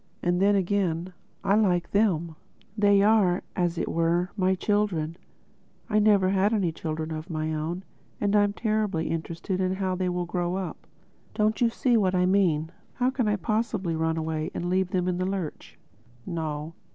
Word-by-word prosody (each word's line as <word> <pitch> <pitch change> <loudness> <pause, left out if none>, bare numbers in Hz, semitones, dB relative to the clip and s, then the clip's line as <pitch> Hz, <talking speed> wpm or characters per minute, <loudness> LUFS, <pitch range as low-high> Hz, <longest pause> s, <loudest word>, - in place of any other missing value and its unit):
And 175 +1 +1
then 200 +1 +4
again, 185 -2 0 0.3
I 195 - +2
like 185 -5 +2
them. 170 -6 +1 0.4
They 205 -2 +4
are, 205 -4 +3
as 175 -2 0
it - - -1
were, 170 +2 +1
my 190 -2 +2
children—I 205 +2 -3
never 205 -3 +4
had 195 +3 +2
any 185 -6 +1
children 160 0 -4
of 155 +3 -5
my 155 -1 -2
own—and 175 +5 -4
I 205 - +6
am 205 0 0
terribly 215 -7 -1
interested 165 +3 -3
in 185 0 0
how 190 -1 -1
they 185 0 -1
will 180 0 -2
grow 175 0 -2
up. 190 -1 -5 0.5
Don't 215 0 +1
you 235 - +5
see 240 +1 +2
what 190 -3 +2
I 180 0 +3
mean?—How 185 +6 0
can 255 -4 0
I 210 - +2
possibly 210 -3 -1
run 160 0 0
away 160 0 -2
and 175 +1 -2
leave 185 0 +1
them 180 -1 0
in 180 -1 0
the 185 - 0
lurch?... 190 -5 -5 0.5
No. 160 -2 -4
185 Hz, 170 wpm, -26 LUFS, 165-205 Hz, 0.5 s, I